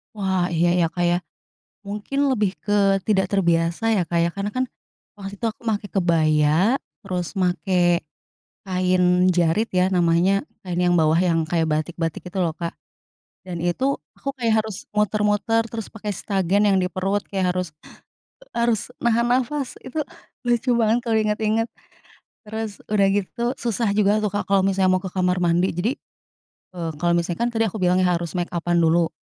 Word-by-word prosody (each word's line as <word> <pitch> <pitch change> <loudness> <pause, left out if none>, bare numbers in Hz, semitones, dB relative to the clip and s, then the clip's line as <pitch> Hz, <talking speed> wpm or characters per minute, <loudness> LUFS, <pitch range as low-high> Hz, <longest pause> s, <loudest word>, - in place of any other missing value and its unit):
Wah, 190 -3 0
iya 170 +1 +2
ya, 175 -2 +3
Kak, 175 +1 -1
ya, 175 0 +3 0.6
mungkin 210 +8 -2
lebih 215 -7 +1
ke 200 -2 +2
tidak 190 -3 +3
terbiasa 170 +2 +1
ya, 180 - +1
Kak, 170 +1 -1
ya. 170 - +2
Karena 200 +1 -2
kan 255 - +2 0.5
waktu 195 -1 -7
itu 230 - 0
aku 225 +1 -9
make 210 -2 -1
kebaya, 165 - +3 0.2
terus 180 -5 -4
make 180 -1 +2 0.6
kain 180 0 +3
jarit 175 +5 +1
ya 185 0 +2
namanya. 175 +3 +3 0.2
Kain 175 -1 -2
yang 175 0 +3
bawah 155 -1 +3
yang 165 -2 +2
kayak 165 0 0
batik-batik, 165 +2 -2
gitu 185 +1 -2
loh, 170 - +1
Kak. 170 -1 -4 0.7
Dan 175 -3 -5
itu, 255 +11 0 0.2
aku 275 - -4
kayak 220 -3 +2
harus 215 -4 -8
muter-muter 210 +1 +1
terus 225 -2 -7
pakai 215 -1 -6
stagen 195 0 0
yang 195 -1 +4
di 180 - -1
perut 195 +3 -1
kayak 185 -2 0
harus 180 -1 -2 0.9
harus 235 -2 +2 0.2
nahan 235 0 +2
nafas. 255 +2 0
Itu 295 +3 -4 0.4
lucu 240 0 +2
banget 230 +1 +2
kalau 225 -2 +1
inget-inget. 215 +1 +1 0.8
Terus 220 -1 -6
sudah 205 -2 +3
gitu, 205 +3 -3
susah 235 -3 -1
juga 205 0 +3
tuh, 210 -2 -1
Kak, 205 - -3
kalau 195 -1 +3
misalnya 190 -1 +2
mau - - -6
ke 185 - -6
kamar 180 -1 +1
mandi. 175 +1 +2
Jadi, 190 +9 -1 0.8
eee, 165 -2 -3
kalau 170 0 +2
misalnya 170 +3 -2
kan 235 - +2
tadi 225 -1 0
aku 215 -1 -3
bilang, 180 0 +3
iya, 185 -1 +3
harus 170 0 -5
mekapan 175 -1 -1
dulu. 165 +1 +3
190 Hz, 170 wpm, -22 LUFS, 175-215 Hz, 0.9 s, yang